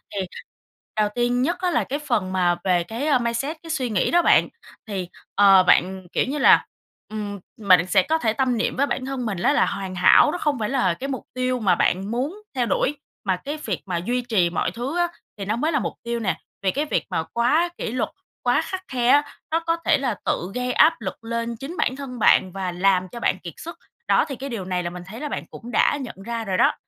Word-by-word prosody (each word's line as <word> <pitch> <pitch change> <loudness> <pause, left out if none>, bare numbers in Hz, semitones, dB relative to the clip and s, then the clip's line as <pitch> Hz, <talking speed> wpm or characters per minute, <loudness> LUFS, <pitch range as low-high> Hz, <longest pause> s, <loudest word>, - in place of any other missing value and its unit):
thì 200 - 0 0.8
đầu 210 -1 +3
tiên 245 +1 +1
nhất 340 +7 0
á 365 -1 +1
là - - +2
cái 285 +2 -3
phần 225 -11 -1
mà 175 -2 +2
về 180 -2 +2
cái, 230 - -4
a, 285 -4 +4
mindset, 240 +7 -2
cái 330 - -10
suy 270 -6 -1
nghĩ 205 -4 +1
đó 345 - +5
bạn, - - +5 0.4
thì, 190 -4 -4 0.3
ờ, 195 -2 +7
bạn, 185 +1 +2
kiểu - - +1
như 275 +3 -3
là, 290 - +6 0.4
ừm, 205 -2 -5 0.2
mình 185 -4 +5
sẽ 190 0 +4
có 320 +8 +1
thể 225 -8 0
tâm 255 -1 +1
niệm 225 - -1
với 275 - +2
bản 255 - -2
thân 265 -2 -3
mình 205 -4 -2
á 285 - +4
là 295 - +4
hoàn 190 -1 -4
hảo 185 +10 +6
nó 355 - -3
không 295 -6 0
phải 210 - -1
là 245 -10 +2
cái 260 +11 -6
mục 265 - -4
tiêu 255 0 -1
mà 210 -5 +3
bạn 195 +4 0
muốn 280 - -3
theo 250 -2 +1
đuổi, 285 +4 0 0.3
mà 190 -2 +2
cái 290 +11 -5
việc 200 -5 -2
mà 180 -3 -2
duy 240 +9 -1
trì 215 -8 +1
mọi 170 - -1
thứ 260 +8 -4
á 350 0 +3 0.3
thì 200 - -5
nó 210 +3 0
mới 305 +7 0
là 295 - +2
mục - - -3
tiêu 235 0 -2
nè, 205 -4 -1 0.2
vì 190 -1 +1
cái 290 +7 -1
việc - - -1
mà 165 -4 -1
quá 300 +9 +2
kỷ - - -3
luật, 255 - -1 0.3
quá - - +3
khắt 375 0 -4
khe 245 -2 0
á, 290 +2 +6 0.3
nó 325 - +2
có 330 0 -1
thể 315 - +4
là 260 -5 -1
tự 180 +3 -1
gây 250 0 -1
áp 320 -4 +4
lực 195 +1 -6
lên 230 0 -3
chính 280 +9 -7
bản 260 - +1
thân 265 -3 -7
bạn 185 -3 +4
và 190 -1 -3
làm 185 +1 +2
cho 235 - -8
bạn 190 - 0
kiệt 170 -3 -8
sức. 335 - -9 0.3
Đó, - - +4
thì 275 - -5
cái 270 +3 -6
điều 220 -7 -4
này 180 -1 -1
là 175 - -2
mình 175 0 -8
thấy 220 +4 -8
là 300 - -3
bạn - - -4
cũng 240 +1 -10
đã 290 - +3
nhận 255 - -7
ra 235 -1 -3
rồi 190 -2 -1
đó. - - +4
235 Hz, 250 wpm, -23 LUFS, 190-275 Hz, 0.8 s, ờ